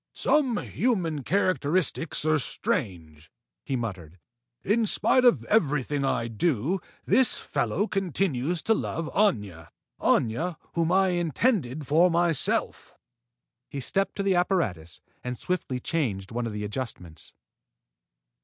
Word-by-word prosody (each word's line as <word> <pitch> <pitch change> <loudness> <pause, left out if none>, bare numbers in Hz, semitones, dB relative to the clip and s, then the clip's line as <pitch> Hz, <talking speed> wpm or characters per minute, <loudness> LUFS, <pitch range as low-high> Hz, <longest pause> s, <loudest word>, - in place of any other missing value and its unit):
"Some 265 -7 +2
human 180 - -1
characteristics 165 -1 0
are 155 -1 +3
strange," 95 - -3 0.3
he 135 - -2
muttered. 95 -8 -5 0.5
"In 220 +2 +2
spite 255 +5 +3
of 245 -2 +4
everything 150 - +1
I 115 -3 0
do, 140 - 0 0.3
this 245 +6 +3
fellow 205 - -1
continues 175 - -1
to 225 - +3
love 165 -6 -3
Aña: 105 - 0 0.3
Aña 160 +10 +1 0.2
whom 170 0 +1
I 190 0 +4
intend 170 - 0
for 165 +6 +4
myself." 170 -3 0 0.7
He 140 - -5
stepped 195 +9 -1
to 200 - -2
the 195 -1 +2
apparatus 140 - -1 0.2
and 125 0 -4
swiftly 170 -7 -3
changed 110 -11 -2
one 120 0 -2
of 110 - -5
the 105 0 -4
adjustments. 105 -7 -6
155 Hz, 120 wpm, -26 LUFS, 115-190 Hz, 0.7 s, of